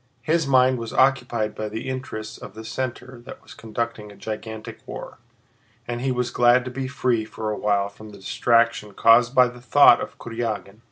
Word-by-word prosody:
His 160 -1 +1
mind 130 -1 +4
was 115 -1 -6
occupied 125 -5 +2
by 110 0 -5
the 110 +4 -6
interests 130 -5 -6
of 100 - -11
the 110 0 -9
center 130 0 -5
that - - -10
was - - -13
conducting 115 -1 -5
a - - -14
gigantic 110 0 -7
war, - - -8 0.7
and 120 0 -4
he 135 0 0
was 125 -1 -1
glad 120 +1 +4
to 130 - -5
be 130 +1 -4
free 125 -4 0
for 110 0 -5
a - - -2
while 100 -1 +1
from 105 +2 -13
the 100 - -12
distraction 115 0 +1
caused 120 +3 +5
by 125 -1 +6
the 125 0 -11
thought 125 -1 +6
of - - -7
Kurágin. 110 -3 -5
115 Hz, 190 wpm, -23 LUFS, 110-125 Hz, 0.7 s, by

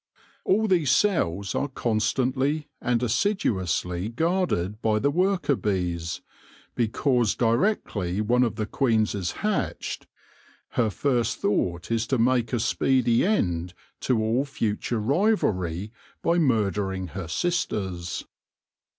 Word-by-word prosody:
All 220 +3 +3
these 170 -8 +2
cells 100 - +1
are 145 - 0
constantly 130 +4 0
and 120 0 +1
assiduously 100 - 0
guarded 120 - 0
by 110 -1 +2
the 140 +6 +1
worker 180 -3 +1
bees, 90 -6 -2 0.5
because 120 0 +1
directly 115 - 0
one 120 +4 +2
of 120 -3 +1
the 110 - -2
queens 110 -3 +1
is 95 -4 -2
hatched, 215 -2 -2 0.6
her 115 -3 +1
first 120 +1 0
thought 90 -2 -1
is 115 0 0
to 130 - +1
make 120 -1 +2
a 120 - 0
speedy 120 +1 +2
end 90 - 0 0.2
to 125 -3 +1
all 110 +4 +1
future 115 -4 -2
rivalry 105 - 0 0.3
by 170 +1 +3
mur 115 -10 +2
dering 95 -3 -3
her 90 -1 -6
sisters. 95 - -2
115 Hz, 120 wpm, -25 LUFS, 95-140 Hz, 0.6 s, All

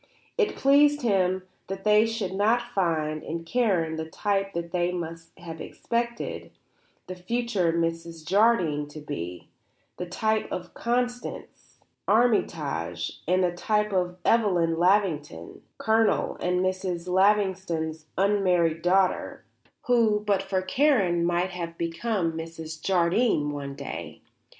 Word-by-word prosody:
It 445 -4 +1
pleased 285 +1 +4
him 190 -4 +2 0.2
that 195 0 -6
they 210 +1 +5
should 220 -5 -3
not 235 +5 +1
find 155 -5 0
in 165 +1 -5
Karen 175 -7 +1
the 160 0 -5
type 195 +2 -1
that 170 0 -4
they 175 -1 0
must 165 -2 -6
have 165 -3 -8
expected 235 0 -3 0.6
the 185 - -6
future 195 -1 -1
Mrs. 165 -1 -3
Jardine 180 -7 +3
to 145 +1 -10
be, 90 - -6 0.5
the 180 - -4
type 220 +4 -1
of 175 -1 -5
Constance 245 +1 -3 0.3
Armytage 150 - 0
and 185 +2 +3
the 180 - +2
type 210 +3 0
of 180 -1 0
Evelyn 175 -8 +2
Lavington, 170 - 0 0.2
Colonel 220 0 +2
and 180 0 0
Mrs. 185 -2 -2
Lavington's 185 -5 +1
unmarried 180 -5 +2
daughter, 185 +1 +1 0.4
who, 225 -4 +3
but 200 -2 +2
for 190 -1 -2
Karen, 190 - +2
might 175 +2 +1
well 175 -2 -4
have 165 0 -17
become 170 +1 -1
Mrs. 160 -1 -7
Jardine 175 -3 +2
one 140 -1 -5
day. - - -7
180 Hz, 125 wpm, -26 LUFS, 165-210 Hz, 0.6 s, they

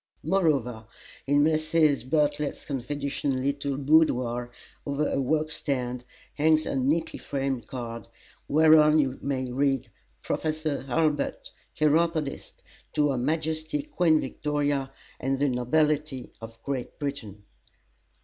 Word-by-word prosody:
Moreover, 135 - +1 0.4
in 145 +1 +4
Mrs. 155 -3 +2
B.'s 150 -1 0
confidential 140 +1 -3
little 140 +1 -1
boudoir, 125 -5 +2 0.3
over 145 +1 -1
her 135 - 0
work 155 +3 0
stand, 125 -5 -3 0.3
hangs 155 +1 +3
a - - -2
neatly 145 +5 0
framed 135 -3 -3
card, 115 -4 -6 0.4
whereon 155 0 +6
you 135 -3 +1
may 130 -2 -2
read: 135 -1 0 0.3
PROFESSOR 155 -3 -2
HURLBUT, 150 +2 0 0.2
Chiropodist 155 -1 0 0.3
To 145 -1 +2
her 130 - -1
Majesty 155 - -1
Queen 175 - +2
Victoria, 145 -1 -1 0.3
and 135 +1 0
the 145 +1 +2
Nobility 145 +2 0
of 115 0 -10
Great 135 -3 -4
Britain. 120 -9 -5
145 Hz, 110 wpm, -27 LUFS, 130-155 Hz, 0.4 s, whereon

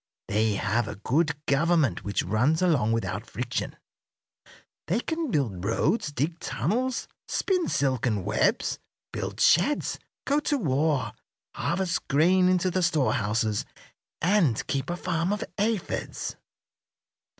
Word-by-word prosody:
They 110 +1 +2
have 105 +3 0
a 105 - -5
good 150 +7 0
government 140 - +2
which 100 -1 -1
runs 125 - +2
along 145 -11 +3
without 115 0 -2
friction. - - -3 1.1
They 195 +7 +1
can 320 0 -2
build 115 - -1
roads, 150 - +1
dig 150 +5 -2
tunnels, 230 - -1 0.2
spin 365 -4 0
silken 125 -8 0
webs, 105 +1 +1 0.3
build - - -4
sheds, 240 - +3 0.3
go 285 +1 +2
to 295 -1 0
war, 140 - 0 0.4
harvest 175 0 -1
grain 180 +6 +4
into 185 0 +2
the 185 - 0
storehouses, 115 - +1 0.6
and 170 - +3
keep 135 +2 -2
a 175 - -2
farm 175 0 -1
of 210 - -1 0.2
aphids." 210 -2 -2
155 Hz, 120 wpm, -27 LUFS, 115-185 Hz, 1.1 s, grain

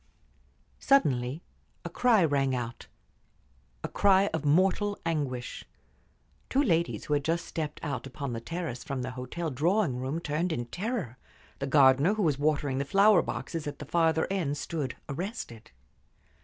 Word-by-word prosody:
Suddenly 140 - +2 0.4
a - - -3
cry 225 -8 +4
rang 135 -3 +1
out 120 -1 -5 1.0
a - - -1
cry 200 0 +3
of 160 - -2
mortal 190 +7 +2
anguish. 140 -7 -2 0.9
Two 275 +2 +3
ladies 170 - 0
who 150 - -1
had 145 -1 +1
just 170 +3 -1
stepped 155 -2 -4
out 135 -4 -3
upon 135 0 -5
the 115 - -4
terrace 165 -4 -5
from 135 -2 -4
the 130 - -4
hotel 140 +6 -4
drawing 160 - +1
room 135 +5 -2
turned 170 +2 -1
in 120 -6 -2
terror; 175 - -4 0.4
the 140 - -2
gardener 140 +6 +5
who 215 - 0
was 145 -5 +1
watering 145 -3 +1
the - - +1
flower 200 +6 +5
boxes 165 -3 -4
at 145 - -5
the 150 - -8
farther 160 +1 +2
end 160 -7 -1
stood 145 -5 -4
arrested. 140 - -6
150 Hz, 155 wpm, -29 LUFS, 135-175 Hz, 1.0 s, gardener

